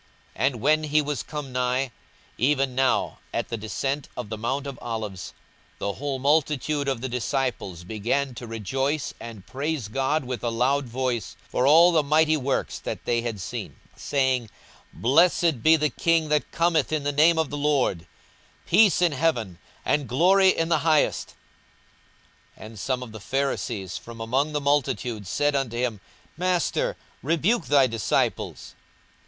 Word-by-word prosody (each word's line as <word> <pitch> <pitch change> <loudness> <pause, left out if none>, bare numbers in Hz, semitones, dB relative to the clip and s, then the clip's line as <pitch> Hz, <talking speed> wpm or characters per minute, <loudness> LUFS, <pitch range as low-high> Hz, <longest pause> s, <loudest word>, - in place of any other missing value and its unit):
42:019:037 - - 0
And 135 - -1
when 155 +3 +3
he 150 0 +3
was 145 -1 -2
come 150 -3 -6
nigh, 125 +1 0 0.5
even 135 0 +2
now 130 +1 +1
at - - -2
the - - -2
descent 135 +6 -3
of 125 -4 -5
the 110 - -4
mount 130 +5 -2
of 140 -3 -7
Olives, 110 -6 -5 0.5
the 100 - -2
whole 140 +2 -3
multitude 145 +1 +1
of 135 -4 -1
the 130 - -2
disciples 120 - -2
began 115 +7 -1
to 120 0 -8
rejoice 135 +7 -2
and 110 -5 -9
praise 140 -4 -3
God 135 +6 0
with 125 -1 -5
a 120 - +1
loud 135 +5 +1
voice 120 -3 -3
for 125 - +1
all 165 +4 +7
the 160 -2 +4
mighty 155 +2 +3
works 135 -2 -2
that - - -6
they 120 -1 +1
had 115 -3 -4
seen; 90 - -6 0.2
42:019:038 - - -22
Saying, 130 -5 0 0.4
Blessed 165 +1 +3
be 160 +6 +6
the 150 -1 0
King 165 -2 +1
that 150 -1 +1
cometh 165 -3 +1
in 155 -2 0
the 145 - 0
name 160 +4 +4
of 160 -3 0
the 145 - -3
Lord: 140 - 0 0.6
peace 195 -2 +5
in 175 - +4
heaven, 125 - -1 0.3
and 145 -5 0
glory 190 +8 +5
in 165 -2 +1
the 170 - +3
highest. 155 -2 +1 1.2
42:019:039 - - -10
And 110 -1 -10
some 130 +1 -2
of 120 - -9
the 110 - -9
Pharisees 120 -6 -2
from 115 0 -11
among 130 +7 0
the 150 - +1
multitude 130 -7 0
said 145 +8 +1
unto 130 -4 -1
him, 120 -4 -1 0.4
Master, 180 -1 0 0.2
rebuke 170 - +1
thy 140 -2 +5
disciples. 115 -4 -1
135 Hz, 165 wpm, -25 LUFS, 120-150 Hz, 1.2 s, all